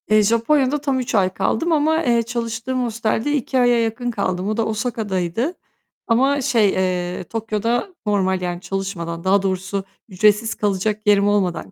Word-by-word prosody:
Eee, 215 0 +5
Japonya'da 260 +6 +2
tam 275 -3 0
3 250 -1 -3
ay 190 -3 +3
kaldım 330 - 0
ama, 315 +1 +2
eee, 235 -2 +2
çalıştığım 235 +2 -3
hostelde 230 +3 -1
2 265 -2 0
aya 245 -1 +4
yakın 235 +2 -2
kaldım. 185 -3 -2
O 215 - -2
da 225 - +1
Osaka'daydı 220 - -2 0.5
ama 270 +4 +2
şey, 230 -5 +3
eee, 180 -1 -1
Tokyo'da 225 - -2
normal 190 -3 +1
yani 175 -1 -3
çalışmadan, 180 -4 -4
daha 195 +1 +3
doğrusu 195 +1 -2 0.3
ücretsiz 210 +3 +2
kalacak 210 +1 -1
yerim 205 -1 +4
olmadan 185 - 0
215 Hz, 155 wpm, -20 LUFS, 190-245 Hz, 0.5 s, Eee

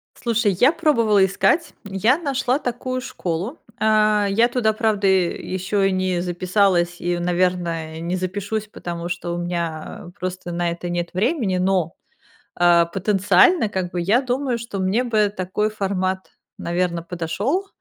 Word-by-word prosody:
Слушай, 230 -3 +1
я 260 +4 +6
пробовала 230 - +3
искать, 195 - +1
я 205 +6 +2
нашла 275 -4 0
такую 255 0 -3
школу. 190 - -4 0.2
А, 215 -1 +3
я 230 +4 +4
туда, 240 -3 +1
правда, 215 -2 +1
э, 190 -2 +2
еще 195 +2 0
и - - -1
не 185 -1 0
записалась 180 0 +1
и, 175 0 -1
наверное, 175 -2 -1
не 170 +2 -2
запишусь, 205 +4 -3
потому 170 -4 -6
что 175 -1 -4
у - - -4
меня, 175 -1 -1 0.4
а, - - -11
просто 185 -1 -4
на 175 0 -1
это 175 +1 -5
нет 175 0 -2
времени. 215 - 0
Но, 180 -3 0 0.6
а, 175 -1 +5
потенциально, 210 - +3
как 185 -3 -3
бы, 175 - -2
я 210 +9 +3
думаю, 255 -1 -1
что 235 -4 -6
мне 190 +6 +1
бы 215 -4 +2
такой 190 +3 -1
формат, 190 -2 -2 0.3
наверно, 170 -1 -1
подошел, 190 - -2
190 Hz, 150 wpm, -22 LUFS, 175-220 Hz, 0.6 s, я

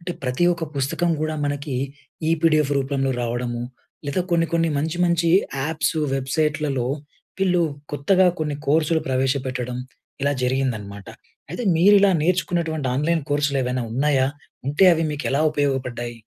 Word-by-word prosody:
అంటే, 175 +1 -4
ప్రతి 130 +6 0
ఒక్క 170 -1 -3
పుస్తకం 150 +6 0
కూడా 155 0 -1
మనకి 145 -2 -2 0.5
ఈ - - +2
పీడిఎఫ్‌ 155 -3 +3
రూపంలో 135 0 -1
రావడము, 120 0 -2 0.4
లేదా 145 +6 0
కొన్ని, 165 -1 +3
కొన్ని 165 -1 +2
మంచి 160 +3 -2
మంచి 170 -1 +2 0.3
యాప్స్, 160 +1 -1 0.2
వెబ్సైట్‌లలో 145 -1 -1 0.5
వీళ్ళు 180 -2 +2 0.3
కొత్తగా 185 +6 +3
కొన్ని 150 -2 -1
కోర్సులు 160 +2 +2
ప్రవేశపెట్టడం 130 -1 -1 0.4
ఇలా 140 +1 +2
జరిగిందనమాట. 115 -7 -2 0.4
అయితే, - - -4
మీరు 200 +5 +6
ఇలా 200 -1 +5
నేర్చుకున్నటువంటి 170 -3 0
ఆన్‍లైన్ 160 +4 +1
కోర్సులు 145 -1 +1
ఏవైనా 125 0 -1
ఉన్నాయా? 135 0 +2 0.4
ఉంటే 145 +7 +3
అవి 165 - +1
మీకు 150 0 -4
ఎలా 140 +3 +1
ఉపయోగపడ్డాయి? 130 -5 -2
145 Hz, 135 wpm, -22 LUFS, 130-165 Hz, 0.5 s, మీరు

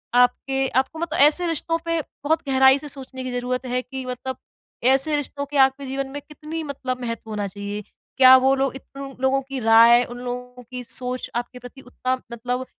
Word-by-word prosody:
आपके 265 +2 +2
आपको 295 +4 -11
मतलब 330 -1 -2
ऐसे 305 +5 +4
रिश्तों 330 0 -1
पे 335 0 0 0.2
बहुत 320 +2 +1
गहराई 265 0 +6
से 295 - -9
सोचने 260 -1 -6
की 255 - -4
ज़रूरत 250 +1 -2
है 250 0 -1
कि 260 0 -7
मतलब 255 +1 -5 0.6
ऐसे 275 +3 +3
रिश्तों 285 0 -3
के 285 +1 -4
आपके 270 +1 -10
जीवन 270 +1 -3
में 290 +1 -6
कितनी 310 +2 -6
मतलब 255 -3 -4
महत्व 230 -2 -5
होना 210 -2 -2
चाहिए। 205 +1 -6 0.4
क्या 260 -1 +9
वो 265 +1 +3
लोग 270 -1 -1
इतने 275 +1 -9
लोगों 265 +1 +2
की 270 0 -6
राय, 230 +1 +7
उन 245 0 -8
लोगों 250 0 -6
की 250 0 -5
सोच 250 +1 -4
आपके 245 +1 -4
प्रति 250 +2 -12
उतना 255 0 -2 0.2
मतलब 245 +2 -3
260 Hz, 190 wpm, -23 LUFS, 250-275 Hz, 0.6 s, क्या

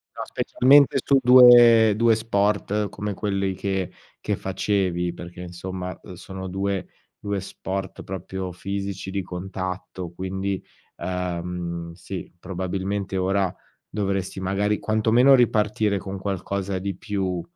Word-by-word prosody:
No, - - -6
specialmente 135 +2 +4
su 140 - +4
due 120 -3 +8
due 115 +1 +4
sport 105 -1 0
come 105 0 -4
quelli 100 -1 -1
che 95 -1 -2 0.3
che - - -1
facevi, 95 -3 -1
perché 85 0 -9
insomma, 90 +1 -6
uhm, - - -10
sono 95 +1 -8
due 95 0 -2 0.3
due 100 -1 -3
sport 95 0 -5
proprio 95 0 -5
fisici, 100 +1 -5
di 100 0 -1
contatto, 90 -1 -5
quindi, 95 +1 -3 0.4
ehm, 90 -2 -4
sì, 95 +2 -7
probabilmente 95 +2 -3
ora 95 0 +1 0.4
dovresti 95 -2 -2
magari 100 +2 0
quantomeno 110 +5 +4
ripartire 105 -3 +2
con 95 +1 -6
qualcosa 95 0 -3
di 100 0 -3
più 95 -5 -2
95 Hz, 120 wpm, -24 LUFS, 90-105 Hz, 0.4 s, due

